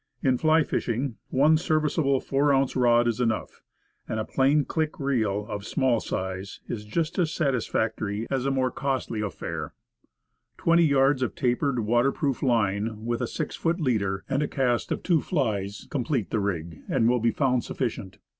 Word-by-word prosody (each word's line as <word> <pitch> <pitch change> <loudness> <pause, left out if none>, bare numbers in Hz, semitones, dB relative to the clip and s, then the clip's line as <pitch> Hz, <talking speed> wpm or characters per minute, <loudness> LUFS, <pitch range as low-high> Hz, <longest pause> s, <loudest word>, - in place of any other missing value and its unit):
In 130 -2 +2
fly 160 0 +4
fishing, 120 -2 -2
one 150 +4 +4
ser 155 -1 +1
viceable 145 -3 +1
ten 135 - 0 0.2
ounce 135 0 +1
rod 120 -2 +4
is 120 +1 0
enough; 115 -3 -2 0.5
and 110 - -2
a 110 - -2
plain 140 +2 +2
click 155 -1 -2
reel, 110 -8 0
of 105 -3 -5
small 125 +1 +1
size, 95 0 -4
is 105 -2 -5
just 160 - -2
as 165 -3 +1
satisfactory 115 - -1
as 135 -1 0
a - - +2
more 130 -2 +1
costly 130 -5 -2
affair. 105 -2 -5 0.8
Twenty 170 0 +4
yards 135 -2 +3
of 125 - -1
tapered, 125 0 0
water 120 +5 +2
proof 140 -4 -2
line, 110 -3 0
with 120 +1 -1
a 125 - 0
six 155 +4 -4
foot 170 +2 0
leader, 100 - 0
and 135 +1 0
a 150 - 0
cast 125 -3 0
of - - -2
two 170 -5 +3
flies, 105 - -2
complete 125 -5 -1
the 110 - +1
rig, 85 -5 -3
and 115 - +2
will 125 +1 +3
be 115 +1 +2
found 125 -1 +1
sufficient. 95 -6 -4
125 Hz, 175 wpm, -26 LUFS, 110-140 Hz, 0.8 s, fly